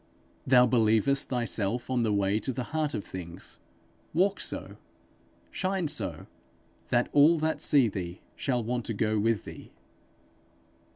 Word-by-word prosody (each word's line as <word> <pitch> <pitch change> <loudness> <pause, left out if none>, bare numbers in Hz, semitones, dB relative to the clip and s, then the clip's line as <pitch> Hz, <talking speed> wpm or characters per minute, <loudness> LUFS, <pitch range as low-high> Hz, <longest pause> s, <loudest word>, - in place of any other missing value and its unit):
Thou 125 -1 +6
believest 115 +2 +2
thyself 120 -2 -1
on 130 -2 0
the 110 -2 +1
way 100 +1 +1
to 130 - -3
the 125 0 -4
heart 155 -1 0
of 100 - -3
things: 90 0 -9 0.6
walk 195 +4 +2
so, - - -5 0.7
shine 185 -3 -1
so, - - -3 0.6
that 120 -1 +2
all 150 +4 +6
that 160 0 -1
see 140 -5 +5
thee 90 -3 -5 0.2
shall 125 -4 -1
want 120 +1 -2
to 115 - -3
go 110 +1 0
with 110 -2 0
thee. - - -10
120 Hz, 140 wpm, -28 LUFS, 105-140 Hz, 0.7 s, Thou